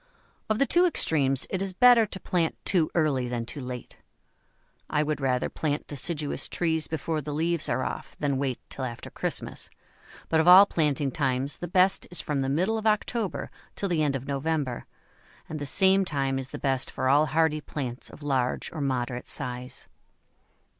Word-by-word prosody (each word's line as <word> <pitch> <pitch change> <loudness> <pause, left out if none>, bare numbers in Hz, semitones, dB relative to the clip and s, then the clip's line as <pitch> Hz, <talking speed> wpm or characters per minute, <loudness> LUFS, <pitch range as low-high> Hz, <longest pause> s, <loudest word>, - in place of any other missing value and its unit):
Of 215 - +2
the 275 - +3
two 350 +5 +4
extremes 135 - +3
it 190 - -1
is 195 -1 -2
better 240 +1 +6
to 190 - -7
plant 170 -4 0
too 170 -5 +2
early 145 -6 +1
than 120 -1 -3
too 145 - -6
late. 125 -2 -7 0.9
I 150 - +1
would 150 -1 -2
rather 130 -2 +1
plant 150 -1 -2
deciduous 150 +1 -1
trees 160 -2 0
before 160 0 -2
the 145 +1 -5
leaves 165 +1 0
are 130 - 0
off - - -5
than 140 -2 0
wait 135 -3 -2
till 135 - -6
after 120 -2 -6
Christmas, - - -3 0.6
but 160 - +2
of 160 - +2
all 185 +3 +10
planting 150 -6 0
times 135 -1 -1
the 175 - -5
best 185 +2 +2
is 180 - -1
from 145 -2 -1
the 135 - -1
middle 185 +10 +1
of 220 - -2
October 215 -1 -1 0.2
till 200 - -2
the 165 -3 +1
end 145 -2 +1
of 135 0 -5
November, 140 -2 -2 0.6
and 155 - -5
the 145 - -4
same 190 +7 +4
time 135 -6 -1
is 130 -1 -4
the - - -6
best 135 -2 0
for - - -2
all 145 +3 +4
hardy 155 -1 +1
plants 130 -5 -5
of 155 - -13
large 130 -3 -1
or 155 - -4
moderate 125 -2 -2
size. 125 0 -4
150 Hz, 185 wpm, -27 LUFS, 135-175 Hz, 0.9 s, all